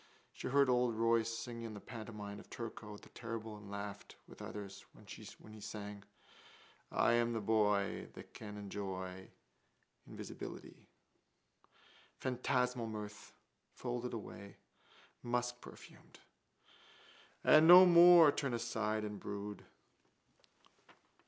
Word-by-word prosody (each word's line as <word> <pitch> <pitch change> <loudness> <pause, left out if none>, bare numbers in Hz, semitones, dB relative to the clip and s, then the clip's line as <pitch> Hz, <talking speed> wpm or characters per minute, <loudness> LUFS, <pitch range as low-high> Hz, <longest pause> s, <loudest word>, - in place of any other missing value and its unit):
She - - -6
heard 140 +1 +4
old 125 -2 +2
Royce 115 0 +2
sing 115 0 -6
in 115 -2 -6
the - - -7
pantomime 105 -2 -8
of - - -15
Turko 110 -2 -7
the - - -16
Terrible 115 -2 -6
and 105 -1 -12
laughed 100 0 -7
with - - -13
others 100 -1 -7
when - - -17
he 110 0 -11
sang: 105 -1 -7 0.9
I - - +3
am 120 0 +2
the 115 - -1
boy 105 -2 +1
That - - -12
can 105 -1 -8
enjoy 95 -2 -6 0.8
Invisibility. - - -9 1.3
Phantasmal 125 - 0
mirth, 105 -1 -8 0.4
folded 125 0 -4
away: 100 -2 -9 0.7
muskperfumed. 120 0 -5 1.3
And 155 +1 +7
no 180 +2 +11
more 175 -3 +9
turn 135 -4 -2
aside 110 -2 -1
and 105 -1 -5
brood. 100 0 -6
110 Hz, 110 wpm, -36 LUFS, 105-120 Hz, 1.3 s, no